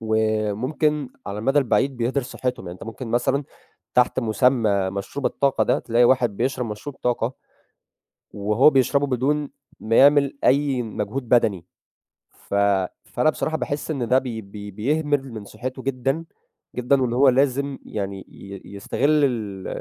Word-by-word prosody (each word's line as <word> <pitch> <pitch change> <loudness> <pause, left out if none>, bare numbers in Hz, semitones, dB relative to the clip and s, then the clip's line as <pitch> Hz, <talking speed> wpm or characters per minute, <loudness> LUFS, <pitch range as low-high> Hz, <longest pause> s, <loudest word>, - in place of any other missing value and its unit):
وممكن 110 +7 0 0.2
على 100 0 -4
المدى 135 +7 +2
البعيد 135 0 +1
بيهدر 125 +4 0
صحتهُم 125 -4 -4
يعني، 85 - -6
أنت - - -9
ممكن 115 +2 -7
مثلًا 130 +4 +1 0.5
تحت 125 +1 +3
مُسمى 110 -4 +2
مشروب 100 +8 -4
الطاقة 140 -1 +1
ده - - +2
تلاقي 120 +1 +2
واحد 120 -4 +3
بيشرب 125 +1 -1
مشروب 110 +6 -7
طاقة. 120 0 0 1.0
وهو 105 +8 +4
بيشربه 140 +1 +2
بدون 140 +3 0 0.3
ما 115 +1 0
يعمل 140 0 +5
أي 135 -2 +3
مجهود 115 +3 -4
بدني، 105 -7 +2 0.7
ف - - -12 0.5
فأنا 155 - +1
بصراحة 155 +1 -2
باحس 145 +3 -3
إن 130 -6 -2
ده 125 - +4
ب - - -13
ب 110 -5 -6 0.2
بيهمل 145 +3 0
من 110 -2 -7
صحته 130 +5 -6
جدًا 135 +4 -1 0.5
جدًا 125 +2 +2
واللي 120 -2 0
هو 135 +2 +6
لازم 135 +1 +1
يعني 100 -2 -4
ي 100 -1 -10
يستغل 145 +9 +2
ال 105 -7 -3
125 Hz, 145 wpm, -23 LUFS, 110-140 Hz, 1.0 s, هو